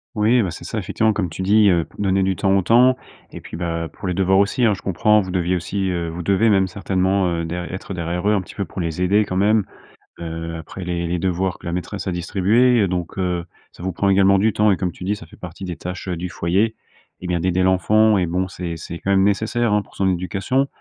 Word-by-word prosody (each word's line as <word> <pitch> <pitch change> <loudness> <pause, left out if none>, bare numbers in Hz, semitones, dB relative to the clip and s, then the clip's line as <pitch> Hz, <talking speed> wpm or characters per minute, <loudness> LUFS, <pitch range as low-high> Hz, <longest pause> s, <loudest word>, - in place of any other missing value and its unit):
Oui, 110 +3 +3
bah, 95 - -1
c'est 80 - -8
ça. - - -4
Effectivement, 110 0 +1
comme 100 -4 -1
tu 80 - -6
dis, 105 +3 +4
heu, 85 -3 +3
p - - -19
donner 95 -1 +2
du 95 -1 0
temps 95 0 +2
au 95 - +3
temps 125 +6 +5 0.4
et - - -9
puis, - - -8
bah, 85 -1 -3
pour - - -7
les 90 - 0
devoirs 95 +1 +2
aussi, 100 +6 +1
hein, 110 -3 +4
je 95 - -7
comprends, 105 +3 +3
vous 95 -3 -3
deviez 90 0 0
aussi, 95 +3 -2
heu, 85 -1 -2
vous 85 +1 -5
devez 100 +4 +3
même 95 -2 +3
certainement, 95 0 0
heu, 85 -1 -1
der 85 +2 -4
être 95 +1 -6
derrière 85 +1 -3
eux 105 - +4
un 100 - +2
petit 95 - -13
peu 100 - -2
pour 95 - -8
les 85 0 -3
aider 100 +4 +3
quand 95 - -4
même, 105 +1 +3 0.5
heu, 80 0 -5
après 80 +3 -8
les 85 -1 -2
les 90 +1 -1
devoirs 90 +1 -1
que - - -16
la 85 - -3
maîtresse 95 +3 -4
a 95 - -1
distribués. 105 +8 +2
Heu, 100 - +3
donc, 90 0 -4
heu, 90 -2 -1 0.3
ça - - -15
vous 95 +1 -2
prend 100 +3 -1
également 100 0 +5
du 105 +2 +2
temps 105 -1 +3
et 95 - +1
comme 90 -1 -2
tu 90 - -11
dis, 100 +3 0
ça - - -11
fait - - -16
partie 95 - -8
des 90 -2 -5
tâches 90 +1 -6
heu, 90 - -1
du 90 +2 -5
foyer, 95 +7 0 0.5
eh - - -7
bien, 90 -1 0
d'aider 90 +2 +1
l'enfant 105 +3 +3
et 90 - 0
bon, 90 +2 -1
c'est 90 -3 -5
c'est 85 +1 -7
quand 100 - -4
même 95 -1 +4
nécessaire, 110 +2 +1
hein, 105 - +3
pour - - -19
son 95 - +1
éducation. 95 +10 -1
95 Hz, 265 wpm, -21 LUFS, 90-100 Hz, 0.5 s, temps